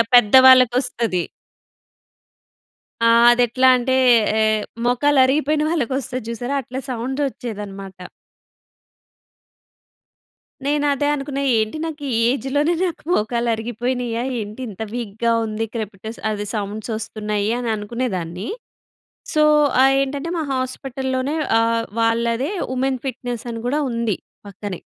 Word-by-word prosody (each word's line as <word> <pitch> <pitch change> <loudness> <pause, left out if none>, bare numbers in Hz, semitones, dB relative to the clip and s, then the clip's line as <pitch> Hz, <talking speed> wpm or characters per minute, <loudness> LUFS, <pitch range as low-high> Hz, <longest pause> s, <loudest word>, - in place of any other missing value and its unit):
పెద్దవాళ్ళకొస్తది. 245 -4 +5 1.8
ఆహ్, 235 +1 +6
అది 245 0 +3
ఎట్లా 255 +3 +2
అంటే, 260 +1 0 0.4
ఏ - - +3 0.4
మోకాలు 270 +4 +3
అరిగిపోయిన 300 +3 +1
వాళ్ళకి 275 -7 -1
వస్తాది 255 -2 -4
చూసారా? 245 +4 -3
అట్లా 255 +3 -6
సౌండ్ 255 +4 -3
ఒచ్చేదనమాట. 200 -5 -8 2.7
నేను 290 0 +1
అదే 290 +1 -1
అనుకున్నా. 275 0 -4 0.2
ఏంటి 220 +8 -2
నాకు 310 -2 -6
ఈ - - +2
ఏజ్‌ 270 0 -3
లోనే 300 +4 +3
నాకు 345 -4 -3
మోకాళ్ళు 235 -2 0
అరిగిపోయినాయా, 240 +1 -3 0.2
ఏంటి 215 +4 -7
ఇంత 210 +1 -10
వీక్‌గా 230 -1 -2
ఉంది, 220 +1 -3
క్రెపిటస్ 220 0 -6
అదే 205 0 -3
సౌండ్స్ 210 +2 -4
ఒస్తున్నాయి 210 -1 -3
అని 240 - -3
అనుకునేదాన్ని. 205 -4 -4 0.9
సో, 305 - +3 0.4
ఆహ్, 270 0 +5
ఏంటంటే, 280 +3 -3
మా 320 - -1
హాస్పిటల్‌లోనే 260 +1 -3 0.3
ఆహ్, 230 0 +1 0.2
వాళ్ళదే 235 - +1 0.2
వుమెన్ 260 0 -1
ఫిట్నెస్ 245 -2 -4
అని 230 -1 -5
కూడా 290 +5 0
ఉంది 230 -4 -1 0.3
పక్కనే. 200 -2 -7
240 Hz, 115 wpm, -21 LUFS, 220-265 Hz, 2.7 s, ఆహ్